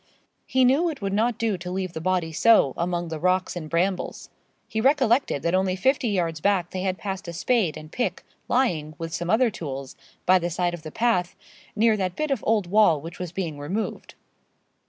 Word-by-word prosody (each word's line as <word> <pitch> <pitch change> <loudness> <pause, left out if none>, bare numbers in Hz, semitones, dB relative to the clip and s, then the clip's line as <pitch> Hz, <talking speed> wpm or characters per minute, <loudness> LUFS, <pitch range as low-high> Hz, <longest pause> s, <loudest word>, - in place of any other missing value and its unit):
He 260 0 +3
knew 290 +8 +3
it 305 - -6
would 195 0 -1
not 225 +2 +1
do 220 -5 -1
to 180 +1 -6
leave 185 -1 -3
the 160 - -5
body 180 -2 0
so, 185 - +4
among 175 0 -2
the 160 -1 -4
rocks 185 +2 +1
and 160 -3 -6
brambles. 180 +3 -1 0.4
He 220 - -2
recollected 260 - +2
that 170 - 0
only 185 0 +2
fifty 265 +6 +1
yards 170 -6 -1
back 190 -3 +1
they 185 - -3
had 185 0 -1
passed 195 -2 -5
a 170 - -5
spade 190 -3 +1
and 155 0 -11
pick, 245 - -2 0.2
lying, 165 - 0
with 165 0 -6
some 175 +1 -3
other 230 +2 +3
tools, 135 -7 -6 0.3
by 185 +1 +5
the 175 0 -2
side 175 +1 -1
of 175 - -6
the 155 0 -8
path, 190 -6 +1 0.4
near 220 +1 +4
that 185 -2 -2
bit 305 +3 -2
of 265 -6 -1
old 215 -3 +2
wall 180 -4 +4
which 165 +3 -9
was 180 -2 -5
being 170 -6 -4
removed. 190 +10 -4
185 Hz, 205 wpm, -25 LUFS, 170-220 Hz, 0.4 s, by